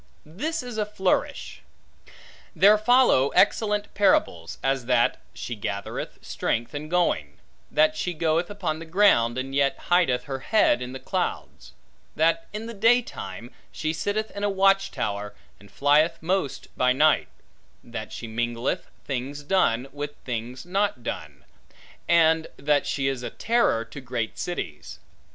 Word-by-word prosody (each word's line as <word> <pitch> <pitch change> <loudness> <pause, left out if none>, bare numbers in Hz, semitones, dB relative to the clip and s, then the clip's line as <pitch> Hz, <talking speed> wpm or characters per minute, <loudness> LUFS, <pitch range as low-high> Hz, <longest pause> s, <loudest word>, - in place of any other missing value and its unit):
This 300 - -3
is 245 -3 -6
a 210 - +1
flourish. 190 -3 -1 0.9
There 205 +2 +7
follow 215 - +4
excellent 210 -1 +2
parables; 85 - +1
as 135 -3 0
that, 125 -2 +2
she 120 - -6
gathereth 100 -2 -5
strength 120 +4 -2
in 150 +1 -6
going; 175 0 0 0.3
that 310 0 +3
she 180 - -3
goeth 165 +2 0
upon 180 -6 -3
the 165 - -8
ground, 160 - +4
and 135 +1 -4
yet 140 0 +2 0.2
hideth 170 -9 +3
her 135 -2 -5
head 215 - +3
in 125 +1 -5
the 130 - -6
clouds; - - -4 0.4
that 165 +1 +2
in 215 +2 -5
the 230 - -6
daytime 195 - 0 0.2
she 155 0 -2
sitteth 210 +6 -2
in 200 - -6
a 205 - +2
watch 195 0 +3
tower, 100 0 -4 0.2
and 100 - -17
flieth 150 - +3
most 180 -3 -2
by 125 0 +3
night; 155 +4 +3 0.6
that - - -7
she - - -7
mingleth 120 +2 -2 0.2
things 140 +2 -4
done, 135 -7 +1
with 145 0 -5
things 120 +2 -5
not 195 - -1
done; 75 -6 -6 0.6
and 160 -1 +4
that 145 +1 +1
she 135 -1 -1
is 135 -2 -2
a - - -4
terror 225 - +1
to 115 +5 -10
great 120 -3 -4
cities. 80 - -5
150 Hz, 145 wpm, -25 LUFS, 125-195 Hz, 0.9 s, There